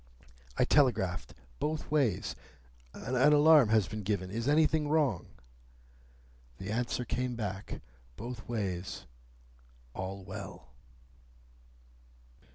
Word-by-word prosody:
I - - +4
telegraphed 110 -11 +2 0.2
both 155 0 -2
ways, 115 - +1 0.6
'An 125 - -4 0.2
alarm 150 -4 +7
has 110 -3 +3
been 110 0 -5
given. 95 -2 -2
Is 115 +4 -3
anything 150 0 +3
wrong?' 145 - +1 1.3
The 95 +2 -5
answer 120 +2 -1
came 125 +1 -2
back, 100 -3 -5 0.3
both 120 0 -7
ways, 90 - -3 0.9
'All 95 +1 -5
well. 95 - -8
110 Hz, 95 wpm, -31 LUFS, 95-135 Hz, 1.3 s, alarm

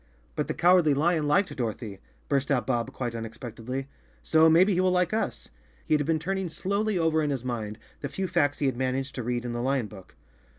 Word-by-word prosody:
"But 150 - -1
the 155 - -3
Cowardly 175 -4 +5
Lion 155 +1 +2
liked 150 +7 +2
Dorothy," 110 -4 -4 0.3
burst 140 -1 0
out 135 -4 +1
Bob 120 -3 -1
quite 120 -2 -4
unexpectedly, 115 +3 -6 0.4
"so 160 0 +5
maybe 180 +5 +5
he 180 - +2
will 185 - +3
like 180 +1 +1
us." 220 - -2 0.4
He - - 0
had 150 -1 +3
been 165 -1 +2
turning 190 +3 -2
slowly 200 +5 -1
over 160 -2 +2
in 150 - 0
his 130 -3 -2
mind 110 -4 -3 0.2
the 140 - -4
few 190 +6 -3
facts 145 -4 +1
he 145 - -1
had 130 -3 0
managed 130 +2 -1
to 125 - -4
read 120 +1 -2
in 120 - -3
the 120 - -2
lion 130 -1 +1
book. 100 -3 -13
140 Hz, 215 wpm, -27 LUFS, 120-165 Hz, 0.4 s, Cowardly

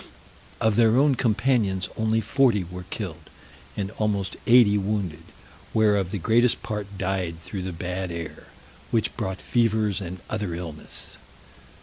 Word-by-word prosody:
Of 110 -2 +2
their 115 0 +5
own 140 +1 +5
companions 110 -5 +1
only 110 0 +1
forty 110 -2 +3
were 90 +1 -9
killed, 85 -8 -6 0.5
and 100 -1 -2
almost 100 -3 0
eighty 115 -4 +7
wounded, 100 -6 -1 0.5
whereof 105 -4 +3
the 100 - -3
greatest 115 +6 +3
part 105 -3 -5
died 90 -3 -1
through 95 +4 -6
the 95 0 -3
bad 90 +2 -4
air, 85 -2 -7 0.4
which - - 0
brought 95 0 -3
fevers 110 -4 +1
and 90 0 -6
other 105 -6 -2
illness. 80 -3 -6
100 Hz, 135 wpm, -25 LUFS, 90-110 Hz, 0.5 s, eighty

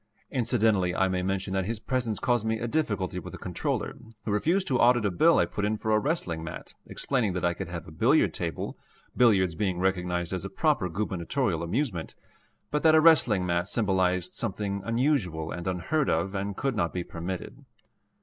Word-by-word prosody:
Incidentally 110 -8 +2
I 95 - +3
may 95 -1 -1
mention 95 +1 -2
that 95 -1 0
his 115 +3 -2
presence 120 -3 -1
caused 120 -3 +1
me 110 0 0
a 120 +2 -3
difficulty 105 - -1
with - - -9
the - - -6
Comptroller, - - -3 0.3
who 105 - -1
refused 170 - +1
to 130 - +2
audit 120 -2 +4
a 100 - +1
bill 85 - +4
I - - +4
put 100 - -4
in 105 +1 0
for 110 - -2
a 110 - +4
wrestling 105 - -2
mat, 85 +1 -8
explaining 120 -8 -1
that 90 - -1
I 85 - +2
could 95 +1 -6
have 85 -1 -7
a - - -10
billiard 80 - +3
table, - - -4 0.4
billiards 100 -8 +4
being 95 +1 -1
recognized 90 -1 -1
as 90 - -3
a - - -5
proper 90 - +1
Gubernatorial 95 - -1
amusement, 90 - -2 0.6
but 150 - 0
that 160 -1 +6
a - - +7
wrestling 135 - +5
mat 85 0 0
symbolized 95 -4 +1
something 100 -2 -2
unusual 115 - 0
and 85 0 -5
unheard 95 - 0
of 95 0 0
and 100 0 -3
could 135 -2 -1
not 85 -5 0
be 90 - -2
permitted. 85 +2 -6
100 Hz, 195 wpm, -27 LUFS, 90-120 Hz, 0.6 s, a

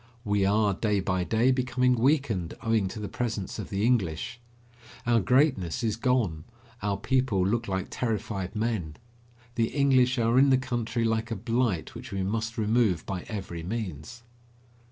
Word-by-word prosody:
We 100 -2 +2
are, 105 0 +3
day 105 +1 0
by 95 -1 0
day, 115 +7 +2
becoming 125 0 +2
weakened 125 - +1
owing 115 -4 +2
to 100 - -6
the 105 - -4
presence 110 -4 -3
of 100 - -5
the 100 +2 0
English. 115 -2 0 0.7
Our 120 -1 +4
greatness 120 - +2
is 110 -2 +1
gone; 115 - 0 0.4
our 100 -1 -1
people 120 -4 +1
look 115 +4 0
like 95 -1 -2
terrified 105 -4 -3
men. 105 -9 -2 0.6
The 115 -1 +1
English 130 -2 +3
are 115 +2 +3
in 140 +1 +6
the 130 - +5
country 120 -2 -2
like 110 0 0
a 115 - -2
blight 115 -5 -1
which - - -9
we 95 -1 -2
must 115 +4 -2
remove 110 -5 +2
by 95 -2 -4
every 95 -6 -5
means. 95 - -5
110 Hz, 160 wpm, -27 LUFS, 95-120 Hz, 0.7 s, in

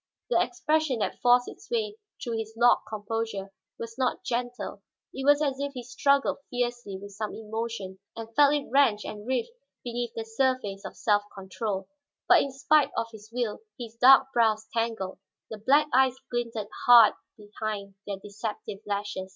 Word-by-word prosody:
The - - +4
expression 310 -6 0
that 215 - -2
forced 245 0 +5
its - - -11
way 440 -3 -1 0.3
through 230 -3 -2
his 220 0 -6
locked 240 +1 +4
composure 215 -2 -4 0.3
was 230 +2 -8
not 255 -1 0
gentle; 245 0 -3 0.3
it 270 - -5
was 290 +1 +5
as 275 -2 -1
if 280 0 -3
he 250 -2 -6
struggled 275 +3 +1
fiercely 240 -5 -3
with 200 +1 -10
some 210 +1 -5
emotion 220 -3 -5 0.2
and 225 0 -8
felt 290 0 +6
it 290 - -2
wrench 255 -6 +3
and 210 +1 -7
writhe 260 - 0 0.3
beneath 240 -1 -4
the 225 - -3
surface 225 -4 -1
of - - -8
self 205 -2 +3
control. 195 0 -4 0.4
But - - +7
in 275 - -2
spite 280 +2 +3
of 230 0 -1
his 215 -1 -13
will, 235 -3 -2 0.2
his 230 -3 -8
dark 265 +3 +6
brows 220 -2 +2
tangled, 225 -5 -2 0.3
the 220 - -6
black 280 +8 +4
eyes 260 0 +4 0.2
glinted 230 -4 -3 0.2
hard 235 -3 +9 0.2
behind 210 -1 -5
their 200 -1 -3
deceptive 205 0 -6
lashes. 200 -2 -3
230 Hz, 165 wpm, -27 LUFS, 210-255 Hz, 0.4 s, hard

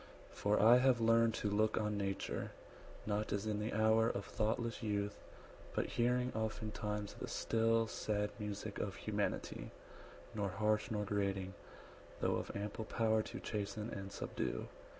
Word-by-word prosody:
For 105 +1 +2
I 115 +4 +8
have 125 -1 +4
learned 115 0 +4
To 105 - 0
look 110 +1 +2
on 105 -1 +1
nature, 100 -1 -2 0.5
not 105 0 -1
as 100 +1 0
in 105 -1 0
the 105 +2 -1
hour 110 +1 +4
Of 100 - -2
thoughtless 115 +3 -1
youth; 105 -2 -1 0.6
but - - +2
hearing 125 +1 +2
oftentimes 105 -1 -2
90 - - -13
The - - -3
still, 115 0 +2
sad 105 -1 -1
music 105 -1 -4
of - - -2
humanity, - - -2 0.6
Nor 100 -2 -1
harsh 105 +2 +1
nor 105 -2 -1
grating, 95 -2 -1 0.7
though - - +2
of - - -4
ample 105 +2 -3
power 110 -1 +2
To - - -6
chasten 105 +1 -3
and 100 0 -5
subdue. - - -3
105 Hz, 150 wpm, -37 LUFS, 105-115 Hz, 0.7 s, I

